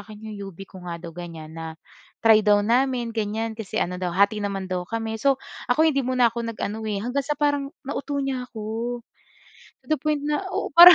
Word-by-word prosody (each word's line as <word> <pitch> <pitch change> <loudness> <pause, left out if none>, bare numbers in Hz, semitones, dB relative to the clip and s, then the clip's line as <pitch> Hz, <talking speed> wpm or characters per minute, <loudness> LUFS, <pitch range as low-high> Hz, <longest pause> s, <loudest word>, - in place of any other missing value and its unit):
akin 215 0 -9
'yong 210 - -6 0.2
UB - - -24
ko 185 - -11
nga 170 - -3
daw 170 -1 -7
ganyan. 165 -2 -8
Na 160 0 -5 0.5
try 220 -1 +7
daw 205 -1 +5
namin 245 +1 +2
ganyan, 220 +1 -1
kasi 215 -3 -4
ano 180 +1 -2
daw 180 -1 0
hati 200 +2 +4
naman 195 -2 -2
daw 180 -1 0
kami. 225 0 -2
So 275 +1 +4 0.3
ako, 310 +6 +5
hindi 275 -2 +1
muna 250 -2 +4
ako 235 0 -3
nag - - -22
eh. 215 0 -2
Hanggang 270 +3 -1
sa 295 - +1
parang 285 -1 +1 0.2
nauto 285 0 -2
niya 260 -2 -2
‘ko. 225 +3 -3 0.8
To - - -25
the 310 - +3
point 300 -1 0
na 300 +5 +1
oo, 380 +2 -2
parang 355 +1 +14
225 Hz, 210 wpm, -25 LUFS, 205-270 Hz, 0.8 s, parang